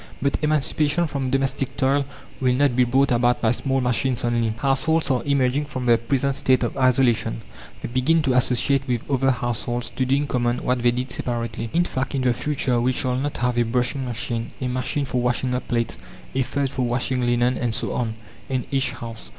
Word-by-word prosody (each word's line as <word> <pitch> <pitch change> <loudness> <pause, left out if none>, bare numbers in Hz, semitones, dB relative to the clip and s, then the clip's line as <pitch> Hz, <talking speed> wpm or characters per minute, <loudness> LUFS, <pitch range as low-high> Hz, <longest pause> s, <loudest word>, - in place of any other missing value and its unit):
But 140 +1 0
emancipation 150 +2 +1
from 140 -4 -2
domestic 135 0 -1
toil 140 +1 +2 0.3
will 125 -1 +2
not 140 -2 +2
be 125 0 +4
brought 135 +3 +2
about 120 0 +3
by 110 - +2
small 135 +2 0
machines 125 +1 0
only. 120 -1 +1
Households 140 +5 +1
are 125 -2 +1
emerging 140 0 +1
from 130 -4 -5
their 120 -1 +4
present 135 +4 +1
state 130 -1 +2
of 120 - -2
isolation; 120 -3 +2 0.4
they - - -2
begin 135 +7 +2
to 135 -3 +2
associate 125 +2 +2
with 120 -3 -2
other 135 0 +2
households 120 -1 -2
to 130 - -1
do 130 +1 +2
in 145 +1 0
common 120 -2 -1
what 125 0 0
they 120 - +4
did 125 +1 -2
separately. 115 -2 -3
In 175 - +3
fact, 135 -4 -3
in 135 - 0
the 125 -1 +3
future 130 -2 0
we 125 +2 +2
shall 125 0 -1
not 140 +3 -2
have 125 0 0
a - - +4
brushing 125 +3 -1
machine, 115 -1 -3
a 130 - -2
machine 130 +3 -1
for 125 -2 -1
washing 125 +1 0
up 125 - -3
plates, 115 - -1 0.3
a 130 - +1
third 135 +1 -1
for 135 -2 -3
washing 125 +1 0
linen, 120 +1 +2
and 120 -2 -1
so - - -2
on, 115 -2 -2 0.3
in 130 -2 -1
each 135 -1 0
house. 115 -3 -8
125 Hz, 205 wpm, -23 LUFS, 120-135 Hz, 0.4 s, be